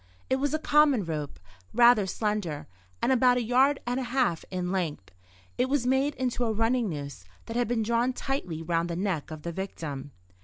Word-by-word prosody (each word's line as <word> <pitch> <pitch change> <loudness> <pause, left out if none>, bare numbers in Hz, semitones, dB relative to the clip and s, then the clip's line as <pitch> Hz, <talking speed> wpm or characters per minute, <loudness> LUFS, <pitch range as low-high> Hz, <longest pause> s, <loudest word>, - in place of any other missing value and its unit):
It 260 - +4
was 280 +1 0
a - - +2
common 300 - +3
rope, 150 -3 -4 0.4
rather 235 -4 +6
slender, 205 -7 -2 0.4
and - - +3
about 250 -1 +4
a 245 - 0
yard 265 +5 +3
and 245 +2 -1
a - - -2
half 245 -10 +1
in 180 -1 -3
length. 160 - -3 0.5
It 255 +1 +2
was 275 -3 +1
made 265 +3 +2
into 250 -1 -1
a 230 - +1
running 225 +1 +1
noose 140 - -6 0.2
that 230 - -7
had 245 0 +1
been 230 -1 0
drawn 235 +3 +1
tightly 215 - -3
round 165 +1 0
the 170 - -2
neck 180 -5 -2
of 155 -1 -8
the 170 - -3
victim. 160 -7 -5
225 Hz, 195 wpm, -28 LUFS, 170-255 Hz, 0.5 s, rather